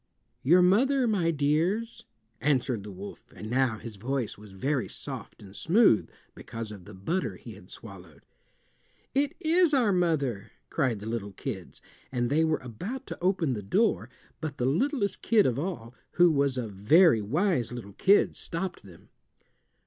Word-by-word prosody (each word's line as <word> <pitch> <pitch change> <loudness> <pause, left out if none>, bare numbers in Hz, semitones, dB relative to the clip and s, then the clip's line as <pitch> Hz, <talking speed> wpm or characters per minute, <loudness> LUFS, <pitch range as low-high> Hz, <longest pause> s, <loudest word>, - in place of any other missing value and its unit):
"Your 175 +7 +5
mother, 255 +8 +3
my 190 -7 +1
dears," 165 +10 0 0.3
answered 130 -5 +1
the 105 +1 -9
wolf, 100 +2 -10
and 110 +1 -7
now 125 -3 +1
his 110 -1 -9
voice 125 +2 -2
was 105 -1 -14
very 130 +7 -1
soft - - -7
and 100 0 -13
smooth 185 - +3 0.2
because 115 -1 -7
of 100 -4 -11
the 105 0 -11
butter 165 - -2
he - - -11
had - - -15
swallowed. - - -12 0.9
"It 280 +1 +1
is 335 -2 +3
our 240 -6 +3
mother," 145 - 0 0.2
cried 125 -9 0
the - - -7
little 110 -3 -4
kids, 95 -4 -7 0.3
and 120 -1 -1
they 155 +3 +3
were 160 -1 +1
about 180 - -6
to - - -8
open 180 -6 +1
the 105 - -4
door, 155 - +1 0.3
but 150 -2 -5
the 125 - -1
littlest 210 - 0
kid 220 -3 +4
of 125 0 +1
all, 145 -9 -5 0.2
who 175 -1 +5
was 140 -3 +1
a 120 -3 -2
very 110 - +4
wise 145 - 0
little 115 -5 -8
kid, 200 - +3
stopped 180 +1 -4
them. 90 -4 -16
140 Hz, 165 wpm, -28 LUFS, 110-185 Hz, 0.9 s, Your